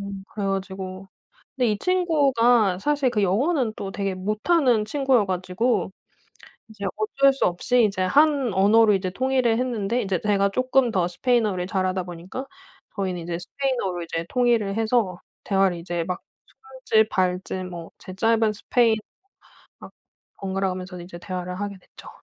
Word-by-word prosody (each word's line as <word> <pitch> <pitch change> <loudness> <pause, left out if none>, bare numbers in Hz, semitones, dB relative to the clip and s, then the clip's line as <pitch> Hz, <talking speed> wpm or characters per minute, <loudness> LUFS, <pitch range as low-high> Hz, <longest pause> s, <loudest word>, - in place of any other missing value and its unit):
음 200 -1 -6
그래 205 - -3
가지고 190 0 -4 0.5
근데 245 -4 +2
이 205 - -3
친구가 265 - +3
사실 285 +1 +1
그 210 -3 0
영어는 240 - +1
또 195 - -4
되게 195 -1 -2
못하는 215 - +1
친구여 265 -2 +2
가지고 185 +3 -1 0.8
이제 215 -2 -9
어쩔 275 +6 +3
수 270 - 0
없이 235 +7 +2
이제 195 -2 -2
한 280 +1 +3
언어로 210 +3 +5
이제 190 -1 -1
통일을 255 0 +1
했는데 240 -2 -1
인제 190 -4 -1
제가 200 -1 +2
쪼끔 255 +2 +2
더 180 -4 +1
스페인어를 210 -2 0
잘하다 185 -2 0
보니까 180 +10 -7 0.5
저희는 185 -3 -2
이제 170 0 -4
스페인어로 195 -5 -2
이제 165 0 -4
통일을 235 -5 +1
해서 220 -5 0 0.2
대화를 195 -3 +2
이제 170 0 -3
막 180 -1 -3 0.6
손짓 220 -1 +4
발짓 185 -1 -1
뭐 170 -2 -8
제 185 - -10
짧은 225 +1 +2
스페인어 225 +1 +2 0.8
막 - - -11 0.5
번갈아가면서 190 -1 -3
이제 175 0 -9
대화를 180 0 -5
하게 200 -1 -4
됐죠. 180 - -15
200 Hz, 325 characters per minute, -24 LUFS, 185-245 Hz, 0.8 s, 언어로